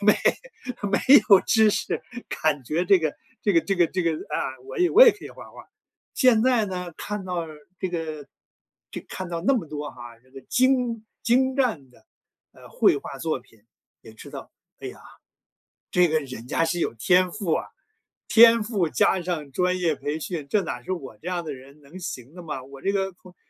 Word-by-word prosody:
没 210 0 +5 0.8
没 195 - +2 0.3
有 195 -2 +8
知 220 -1 +4
识， - - -2 0.4
感 145 -4 +1
觉 155 +7 -1
这 195 -1 +6
个 155 -3 -2 0.3
这 205 - +2
个 165 - +5
这 195 +4 -1
个 175 -1 +4
这 185 -1 -2
个， 165 -1 +1 0.2
啊， 130 - -2
我 - - -7
也 360 - +4
我 445 +8 +8
也 470 - +7
可 - - -11
以 - - -9
画 - - -12
画。 - - -14 0.5
现 235 -4 +4
在 245 -4 +3
呢 180 -2 -5
看 210 -1 -5
到 175 -2 -3 0.3
这 185 -2 -3
个 155 -4 -5 0.6
就 - - -7
看 185 -2 -6
到 170 -1 -4
那 275 - +3
么 220 -11 -1
多 150 -1 -5
哈， 120 -2 -12
这 130 +1 -28
个 135 0 -11
精 250 - +1 0.2
精 260 +4 +2
湛 220 - -1
的， - - -24 0.5
呃， - - -16
绘 - - +3
画 135 -1 -7
作 160 -2 -2
品， 115 -4 -25 0.4
也 110 - -14
知 - - -12
道， - - -9 0.3
哎 - - -8
呀， - - -8 0.9
这 180 0 +4
个 155 - +2
人 125 -3 -9
家 165 - +1
是 175 +1 -1
有 115 - -1
天 180 +9 +3
赋 195 -6 -2
啊， - - -2 0.6
天 230 -1 +7
赋 205 -7 -1
加 180 +8 +2
上 165 -5 -4
专 180 +6 0
业 170 -4 +1
培 150 +2 -4
训， 160 -3 -5
这 210 -2 +2
哪 125 -7 -5
是 185 - -6
我 135 -11 -5
这 175 - -10
样 175 -2 -2
的 150 - -4
人 135 +2 -14
能 155 +7 -12
行 135 -4 -7
的 180 - -10
吗？ 150 -6 -6
我 135 +1 -13
这 195 - 0
个 195 -1 -1
空 180 0 -18
175 Hz, 220 characters per minute, -24 LUFS, 145-205 Hz, 0.9 s, 有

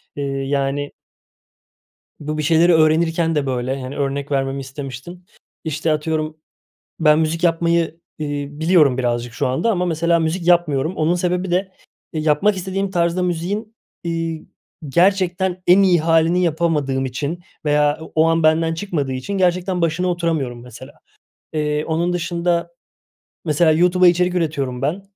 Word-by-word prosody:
Eee, 145 - -3
yani 140 +1 -2 1.3
bu 155 +1 -4
bir 155 - -2
şeyleri 170 +2 +4
öğrenirken 160 +1 +2
de 145 -2 0
böyle, 130 +1 -2
hani, 130 +2 -6
örnek 140 0 -2
vermemi 135 0 -1
istemiştin. 135 +6 -8 0.4
İşte, 160 0 -1
atıyorum, 155 0 -2 0.6
ben 155 -1 +4
müzik 160 +2 -1
yapmayı, 170 -1 +1 0.2
eee, 145 -2 -3
biliyorum 155 -3 +3
birazcık 120 -1 -2
şu - - -1
anda 135 - 0
ama 180 -2 0
mesela 170 0 +1
müzik 165 +2 -2
yapmıyorum. 170 -2 +2
Onun 160 +3 +1
sebebi 180 +1 -1
de, 185 +2 0 0.4
e, 160 - -2
yapmak 155 +7 +2
istediğim 190 +2 -2
tarzda 175 0 +1
müziğin, 190 +6 -3 0.3
iii, 165 -1 -3 0.4
gerçekten 185 +2 +1
en 185 +3 +7
iyi 180 -3 +4
hâlini 165 +2 +3
yapamadığım 150 -5 0
için 140 +6 -4 0.3
veya 150 0 +2
o 160 - -10
o 160 - +4
an 165 0 +2
benden 160 +1 +3
çıkmadığı 165 -7 -3
için 130 +10 -5
gerçekten 180 0 +1
başına 165 +2 0
oturamıyorum 160 -9 -2
mesela. 125 +3 -12 0.6
Eee, 150 -1 -1
onun 170 +2 0
dışında 170 0 -1 0.7
mesela 160 0 +3
YouTube'a 180 +3 +4
içerik 180 +1 +2
üretiyorum 140 -7 -2
ben, 160 +8 -1
160 Hz, 145 wpm, -20 LUFS, 145-175 Hz, 1.3 s, en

